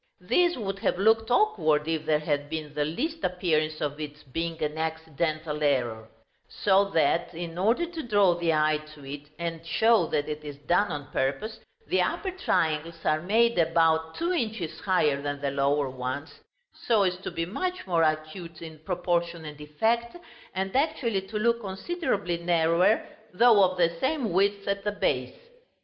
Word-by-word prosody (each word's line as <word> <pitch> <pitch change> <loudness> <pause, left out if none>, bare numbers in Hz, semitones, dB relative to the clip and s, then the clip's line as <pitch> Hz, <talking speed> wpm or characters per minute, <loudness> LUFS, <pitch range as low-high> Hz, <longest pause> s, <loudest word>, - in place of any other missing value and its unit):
This 350 -3 +2
would 195 -4 -4
have 180 - 0
looked 220 +3 +3
awkward, 240 - +2
if 160 -1 -2
there 155 - +4
had 145 -1 -2
been 155 -2 -5
the 150 0 0
least 305 - -3
appearance 155 -4 0
of 145 0 -2
its 150 0 -7
being 165 +4 -4
an 150 0 -1
accidental 160 -1 -2
error; 120 -6 0 0.4
so 200 0 +3
that, 165 -2 +1
in 170 -1 -5
order 230 - +2
to 335 -1 -6
draw 205 - +3
the 170 -1 0
eye 155 -1 +2 0.2
to 145 -2 -13
it, 145 +1 -8
and 165 -1 -4
show 225 +7 +3
that 145 - -1
it 150 0 -5
is 145 -2 -7
done 175 +8 +1
on 145 -1 -6
purpose, 175 +14 -2 0.3
the - - +1
upper 380 - -1
triangles 165 - -1
are 155 0 +2
made 225 +3 +3
about 160 -1 +2
two 340 +2 -1
inches 220 - -3
higher 155 -7 +1
than 145 0 -3
the 140 -1 -1
lower 140 +1 +1
ones, 130 +4 -5 0.3
so 220 -4 +2
as 180 -1 0
to 185 - -6
be 165 - -3
much 365 - -3
more 170 -3 +1
acute 155 +2 -2
in 160 -2 -10
proportion 170 -1 -1
and 150 -1 -9
effect, 230 - -1 0.4
and 190 +2 -2
actually 265 -8 +1
to 195 +3 -6
look 235 +2 +2
considerably 195 - -2
narrower, 170 +4 +2 0.3
though 225 -2 +6
of 185 0 +1
the 170 -1 +3
same 265 - 0
width 200 +2 +1
at 200 0 -1
the 210 - 0
base. 205 - -1
170 Hz, 170 wpm, -27 LUFS, 155-205 Hz, 0.4 s, though